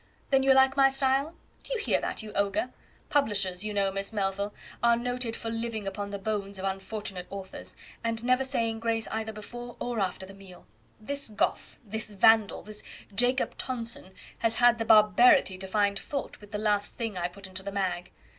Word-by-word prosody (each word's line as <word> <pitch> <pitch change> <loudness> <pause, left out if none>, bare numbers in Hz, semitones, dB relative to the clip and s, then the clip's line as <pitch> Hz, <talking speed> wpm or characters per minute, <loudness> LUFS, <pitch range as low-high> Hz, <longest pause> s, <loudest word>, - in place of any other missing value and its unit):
Then 270 -1 +5
you 270 0 +4
like 265 0 +5
my 270 -1 +6
style? 270 +4 +1 0.3
Do - - -5
you - - -1
hear 410 - +1
that, - - -3
you 215 - -8
ogre? 200 +5 0 0.4
Publishers, 200 -9 +1
you 215 - -3
know, 200 -1 +1
Miss 195 +2 -3
Melville, 200 -1 -1 0.3
are 235 0 +5
noted 245 -1 -2
for 225 - -4
living 225 -2 -3
upon 200 +1 -4
the 200 - -4
bones 200 -1 -3
of 190 - -4
unfortunate 195 -1 -4
authors, 195 -1 -7 0.3
and 230 0 -2
never 255 +2 +3
saying 230 -4 -1
grace 225 -1 0
either 220 0 -2
before 240 +3 -8
or 240 -2 -2
after 190 -1 -1
the 195 - -12
meal. 195 -2 -14 0.3
This 280 +4 0
Goth, 210 - -1
this 220 +1 -3
Vandal, 215 +1 +4
this 215 0 -6 0.3
Jacob 245 +5 +1
Tonson, 230 -6 -5 0.2
has 225 -1 +2
had 240 -1 +5
the 225 - -1
barbarity 215 -1 +6
to 190 - -6
find 200 0 +1
fault 280 -6 -5
with 205 - -13
the 210 - -2
last 205 -1 0
thing 225 -4 -3
I 175 -1 -1
put 190 +2 -12
into 190 0 -6
the 200 +1 -5
"Mag"." 180 -3 -2
215 Hz, 195 wpm, -29 LUFS, 195-240 Hz, 0.4 s, my